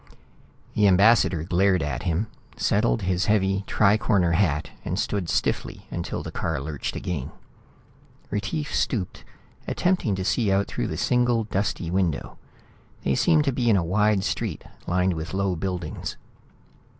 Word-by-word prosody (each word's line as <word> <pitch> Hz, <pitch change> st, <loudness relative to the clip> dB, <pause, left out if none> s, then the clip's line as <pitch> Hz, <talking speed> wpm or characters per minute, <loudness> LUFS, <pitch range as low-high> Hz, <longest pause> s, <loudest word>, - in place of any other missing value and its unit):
The 105 Hz, -1 st, +4 dB
ambassador 95 Hz, -3 st, +4 dB
glared 90 Hz, 0 st, +2 dB
at 65 Hz, -3 st, -3 dB
him, 85 Hz, +5 st, 0 dB, 0.3 s
settled -, -, +1 dB
his 90 Hz, 0 st, 0 dB
heavy 95 Hz, -2 st, +2 dB
tri 105 Hz, 0 st, +3 dB
corner 95 Hz, -7 st, +2 dB
hat 80 Hz, -4 st, +1 dB
and 90 Hz, -, -3 dB
stood 100 Hz, -4 st, -1 dB
stiffly -, -, -1 dB
until -, -, -4 dB
the -, -, -6 dB
car 80 Hz, -4 st, -2 dB
lurched 70 Hz, +1 st, -4 dB
again. 80 Hz, -8 st, -3 dB, 1.0 s
Retief 105 Hz, +9 st, -2 dB
stooped, 100 Hz, -8 st, -1 dB, 0.4 s
attempting 175 Hz, -, +1 dB
to 95 Hz, 0 st, -3 dB
see 105 Hz, -1 st, +1 dB
out 100 Hz, +1 st, +2 dB
through -, -, -3 dB
the -, -, -4 dB
single 120 Hz, -2 st, +2 dB
dusty 100 Hz, -4 st, -2 dB
window. 90 Hz, -5 st, -1 dB, 0.6 s
They 70 Hz, -, +1 dB
seemed 155 Hz, -, +3 dB
to 140 Hz, -, +2 dB
be 120 Hz, -1 st, +1 dB
in 105 Hz, -, +5 dB
a 90 Hz, -, +1 dB
wide 105 Hz, +2 st, +2 dB
street -, -, -2 dB, 0.2 s
lined 90 Hz, +1 st, +2 dB
with 80 Hz, +3 st, -5 dB
low 95 Hz, -2 st, 0 dB
buildings. 90 Hz, -2 st, -4 dB
95 Hz, 150 wpm, -25 LUFS, 85-105 Hz, 1.0 s, in